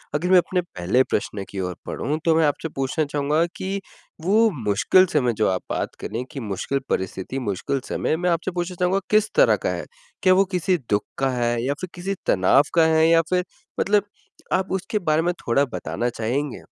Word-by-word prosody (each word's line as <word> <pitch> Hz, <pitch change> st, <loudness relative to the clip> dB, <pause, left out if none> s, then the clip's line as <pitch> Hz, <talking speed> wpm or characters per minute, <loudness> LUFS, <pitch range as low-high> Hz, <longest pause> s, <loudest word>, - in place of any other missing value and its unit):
अगर 175 Hz, +5 st, 0 dB
मैं 185 Hz, -, +7 dB
अपने 180 Hz, +1 st, +2 dB
पहले 125 Hz, -, +1 dB
प्रश्न 105 Hz, -3 st, -2 dB
की 100 Hz, -, -6 dB
ओर 90 Hz, -1 st, -3 dB
बढ़ूँ 150 Hz, +4 st, -2 dB
तो 165 Hz, -1 st, +4 dB
मैं 160 Hz, -1 st, +4 dB
आपसे 150 Hz, +2 st, -2 dB
पूछना 135 Hz, +3 st, 0 dB
चाहूँगा 145 Hz, +3 st, +1 dB
कि 195 Hz, +1 st, -3 dB, 0.4 s
वो 215 Hz, +6 st, +4 dB
मुश्किल 110 Hz, -, +4 dB
समय 125 Hz, -6 st, +2 dB
जो 110 Hz, -, +2 dB
आप 95 Hz, -1 st, -1 dB
बात -, -, -2 dB
करें 115 Hz, +4 st, -4 dB
कि 140 Hz, -, -6 dB
मुश्किल 110 Hz, +5 st, -2 dB
परिस्थिति, 95 Hz, +7 st, -2 dB
मुश्किल 120 Hz, +4 st, -2 dB
समय -, -, 0 dB
मैं 180 Hz, +1 st, 0 dB
आपसे 170 Hz, +2 st, 0 dB
पूछना 175 Hz, +1 st, -3 dB
चाहूँगा 180 Hz, +2 st, +2 dB
किस 215 Hz, 0 st, +3 dB
तरह -, -, +6 dB
का -, -, +2 dB
है? -, -, -3 dB, 0.4 s
क्या 185 Hz, -, +6 dB
वो 195 Hz, +1 st, +4 dB
किसी 180 Hz, +1 st, +2 dB
दुःख 105 Hz, 0 st, +2 dB
का 135 Hz, 0 st, +1 dB
है? 120 Hz, -1 st, 0 dB
या 140 Hz, +3 st, 0 dB
फिर 185 Hz, -, -4 dB
किसी 195 Hz, +3 st, -3 dB
तनाव 95 Hz, +9 st, +4 dB
का 165 Hz, -1 st, +6 dB
है? 160 Hz, 0 st, +4 dB
या 165 Hz, 0 st, +6 dB
फिर 180 Hz, 0 st, +2 dB, 0.4 s
मतलब 205 Hz, 0 st, +3 dB, 0.5 s
आप 190 Hz, 0 st, 0 dB
उसके 190 Hz, +3 st, -1 dB
बारे 155 Hz, -4 st, +1 dB
में 175 Hz, +2 st, 0 dB
थोड़ा 135 Hz, +4 st, +3 dB
बताना 120 Hz, +1 st, -2 dB
चाहेंगे? 120 Hz, +5 st, -3 dB
155 Hz, 200 wpm, -23 LUFS, 120-180 Hz, 0.5 s, मैं